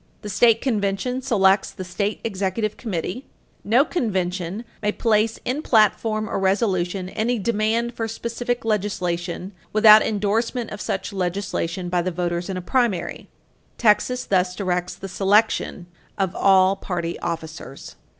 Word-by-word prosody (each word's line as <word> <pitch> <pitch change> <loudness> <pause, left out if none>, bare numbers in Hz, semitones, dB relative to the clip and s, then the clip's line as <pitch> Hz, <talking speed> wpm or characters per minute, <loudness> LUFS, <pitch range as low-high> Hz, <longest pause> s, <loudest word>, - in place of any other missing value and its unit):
The 210 - -5
state 230 +2 +4
convention 220 +1 -1
selects 200 -6 +3
the 185 - -7
state 200 +3 -3
executive 205 0 -2
committee. 215 - -4 0.4
No 240 +7 +4
convention 190 - -2 0.2
may 210 -1 +1
place 220 -1 +1
in 260 +5 -1
platform 215 -3 +2
or 195 - -2
resolution 190 -2 0
any 235 +5 -1
demand 230 +2 0
for 225 -1 -3
specific 235 +2 -3
legislation 185 -4 -2 0.2
without 215 0 +8
endorsement 225 +3 -1
of 210 - -6
such 190 - -3
legislation 180 -1 -2
by 175 0 +1
the 180 - -1
voters 175 0 -2
in 190 - -3
a 180 - -5
primary. 230 -5 -1 0.5
Texas 245 +3 +2
thus 180 -1 +1
directs 180 -2 -2
the 195 - -8
selection 195 -1 +1 0.3
of 190 -2 -1
all 190 0 +4
party 175 -3 -4
officers. 160 -4 -6
200 Hz, 135 wpm, -23 LUFS, 185-225 Hz, 0.5 s, without